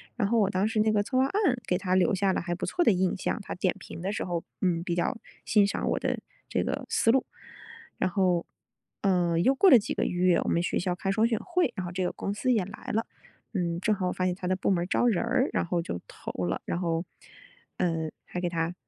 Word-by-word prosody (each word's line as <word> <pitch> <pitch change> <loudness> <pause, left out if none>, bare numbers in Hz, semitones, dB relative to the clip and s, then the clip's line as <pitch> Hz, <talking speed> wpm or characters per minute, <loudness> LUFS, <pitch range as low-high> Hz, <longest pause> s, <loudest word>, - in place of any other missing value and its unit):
然 215 -5 +1
后 230 0 +3
我 200 -3 +3
当 195 +1 +1
时 220 0 -1
那 215 0 +3
个 205 -1 +2
策 255 +5 -2
划 260 - +5
案 360 - +1
给 180 - +2
他 185 -1 0
留 185 0 +3
下 190 0 +2
了 - - -1
还 175 0 -2
不 - - -3
错 355 - +1
的 230 - +5
印 185 -1 +1
象， 190 - -2
他 - - -6
点 185 0 0
评 - - -9
的 190 +3 -2
时 210 - -2
候， 175 -2 -2 0.2
嗯， 170 -3 +1
比 175 -1 -2
较 180 +8 0 0.3
欣 210 -2 +4
赏 - - -2
我 - - 0
的 - - -1 0.3
这 - - 0
个 - - -3
思 225 - +3
路， 265 +2 +2 0.7
然 - - +1
后， 180 -2 +1 0.6
呃， 175 -4 +2
又 260 +11 +4
过 385 +8 +6
了 255 - +10
几 205 - -3
个 - - -1
月， 180 -1 +3
我 - - -1
们 170 - +1
学 - - 0
校 180 0 -1
开 195 +1 -2
双 220 +3 +3
选 225 -2 0
会， 360 0 0
然 185 -3 -3
后 175 - -5
这 185 +1 -2
个 180 - 0
公 200 - -3
司 255 +5 0
也 215 -5 +2
来 200 +3 -9
了。 225 +2 +1 0.5
嗯， 170 -4 -1
正 215 +2 +2
好 185 -2 -1
我 - - -2
发 185 - -1
现 180 -1 0
他 185 - -5
的 185 - +2
部 185 - -1
门 175 -2 +2
儿 - - -5
招 245 - +2
人 220 -3 +2
儿， 255 +3 +1
然 - - +1
后 175 0 0
就 85 - -5
投 - - -7
了， 85 - -2
然 170 - -2
后， 170 -1 -1 0.7
呃， 165 -3 0 0.2
还 180 - -5
给 175 - 0
他 165 0 -1
185 Hz, 285 characters per minute, -28 LUFS, 175-215 Hz, 0.7 s, 了